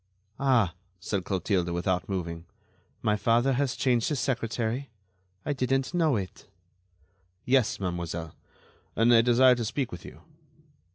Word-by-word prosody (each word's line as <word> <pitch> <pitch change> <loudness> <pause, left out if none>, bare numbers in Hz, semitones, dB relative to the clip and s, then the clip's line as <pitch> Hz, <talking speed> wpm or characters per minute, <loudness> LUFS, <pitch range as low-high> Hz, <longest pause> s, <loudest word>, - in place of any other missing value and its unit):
"Ah!" 125 -10 +3 0.3
said 95 +1 -2
Clotilde, 95 -2 0
without 90 +2 -1
moving, 85 -3 -4 0.6
"my 105 - +2
father 115 +5 +2
has 135 -1 0
changed 120 -3 +1
his 150 -4 -1
secretary? 120 0 -2 0.6
I 145 - 0
didn't 135 +2 0
know 160 -6 +2
it." 95 -3 -5 1.0
"Yes, 130 -2 +2
mademoiselle, 85 -3 -4 0.6
and 115 +2 +4
I 115 - +7
desire 125 +2 +5
to 120 -1 -2
speak 125 +3 -2
with 90 - -8
you." - - -12
115 Hz, 130 wpm, -28 LUFS, 95-130 Hz, 1.0 s, I